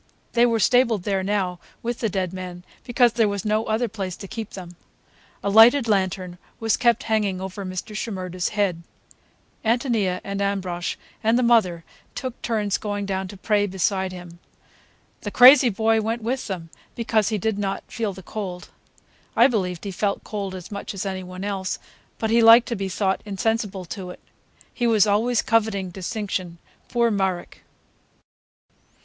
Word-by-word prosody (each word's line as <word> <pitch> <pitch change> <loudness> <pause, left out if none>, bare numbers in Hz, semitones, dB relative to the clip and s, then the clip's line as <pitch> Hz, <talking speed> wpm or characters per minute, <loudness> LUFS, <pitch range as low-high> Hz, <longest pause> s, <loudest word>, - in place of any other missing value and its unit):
They 240 0 +5
were 230 -1 +1
stabled 230 -4 +3
there 195 -1 0
now, 190 -2 -1 0.2
with 240 0 -3
the 225 - 0
dead 185 -2 -2
man, 180 -1 -7 0.2
because 240 -2 +3
there 230 -2 +3
was 200 -1 -4
no 215 +1 +1
other 220 +3 0
place 195 -4 -5
to 195 - -8
keep 220 +1 -6
them. 175 -2 -9 0.7
A 200 - 0
lighted 230 +4 +7
lantern 185 -3 -1 0.2
was 225 -1 +2
kept 235 -2 +2
hanging 210 -4 0
over 190 +1 -6
Mr. 185 +3 -6
Shimerda's 185 -5 -3
head. 200 -5 0 0.8
Ántonia 225 -6 +1
and 200 0 -4
Ambrosch 185 -3 -2 0.3
and 225 +2 +3
the 250 - +2
mother 200 -8 +3 0.3
took 255 -3 -5
turns 210 -4 0
going 205 -1 -3
down 190 -1 -2
to 200 - -10
pray 205 +1 +1
beside 190 0 0
him. 175 -2 -10 0.8
The 205 - -4
crazy 255 +3 +8
boy 220 +1 +2
went 225 +1 -2
with 255 +3 -2
them, 170 -5 -6 0.2
because 220 -3 +1
he 215 - 0
did 205 +1 -1
not 195 -1 -2
feel 225 -4 -3
the 190 0 -11
cold. 185 -3 -6 0.7
I 235 - +7
believed 185 -9 0
he 200 - -4
felt 200 +2 -1
cold 200 -3 -4
as 185 +1 -9
much 200 0 -5
as 195 - -4
any 190 -1 -3
one 185 +1 -8
else, 195 -2 -2 0.4
but 220 -1 -1
he 230 +1 +5
liked 230 +1 +8
to 235 - -1
be 195 -2 -3
thought 190 0 0
insensible 205 -2 -2
to 190 -4 -7
it. 180 - -10 0.5
He 240 - 0
was 220 -3 +5
always 220 +3 +2
coveting 210 -5 +1
distinction, 185 -2 -4 0.3
poor 235 -1 +2
Marek! 190 -3 -2
205 Hz, 170 wpm, -23 LUFS, 185-225 Hz, 0.8 s, crazy